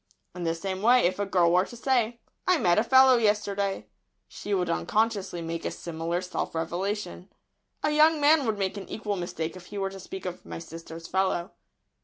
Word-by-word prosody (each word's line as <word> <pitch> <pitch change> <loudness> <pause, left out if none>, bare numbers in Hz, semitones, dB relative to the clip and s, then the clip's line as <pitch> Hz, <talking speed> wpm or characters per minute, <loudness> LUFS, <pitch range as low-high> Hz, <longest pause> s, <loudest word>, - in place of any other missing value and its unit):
In 180 -1 -5
the 165 0 0
same 190 +2 -4
way, 245 +3 +5
if 185 +2 +1
a 205 - -1
girl 175 -3 +3
were 180 +2 +4
to 240 - -11
say 240 -2 0 0.3
"I 365 -1 +5
met 175 - +3
a - - +2
fellow 260 +1 +6
yesterday," 205 -3 0 0.4
she 205 - -8
would 185 -3 +1
unconsciously 195 - 0
make 165 0 -4
a - - -1
similar 170 +1 -3
self 180 -2 -4
revelation. 180 +3 -3 0.5
A 300 - +2
young 310 +1 +5
man 290 -2 +4
would 215 -2 0
make 195 0 -2
an 195 - -8
equal 210 -2 -3
mistake 170 -2 -4
if 180 -1 -12
he 205 - -8
were 195 -1 -1
to 195 - -9
speak 190 +1 -8
of 180 -1 -5
"my - - -7
sister's 165 0 -9
fellow." 190 -1 0
195 Hz, 200 wpm, -27 LUFS, 175-220 Hz, 0.5 s, fellow